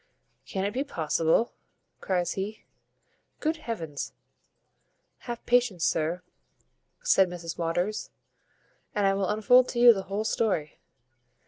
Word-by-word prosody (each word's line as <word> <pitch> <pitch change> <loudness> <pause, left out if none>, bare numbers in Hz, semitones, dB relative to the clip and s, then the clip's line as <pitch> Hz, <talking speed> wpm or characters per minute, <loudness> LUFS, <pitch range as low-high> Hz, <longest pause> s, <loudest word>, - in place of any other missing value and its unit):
"Can 190 0 -2
it 205 - -2
be 265 - 0
possible?" 165 - +1 0.5
cries 180 -2 0
he, 210 +3 -5 0.8
"Good 320 +1 0
heavens!" 170 - -5 1.2
"Have 235 -1 -5
patience, 240 -8 +2
sir," 165 +3 0 0.8
said 190 - +4
Mrs 170 -2 -7
Waters, 175 +5 -1 0.9
"and 205 -1 +2
I 195 - +4
will 195 -1 -1
unfold 245 +4 +4
to 240 - -3
you 240 -1 +9
the 195 - -3
whole 205 +2 -1
story. 210 -8 -1
195 Hz, 120 wpm, -27 LUFS, 175-230 Hz, 1.2 s, you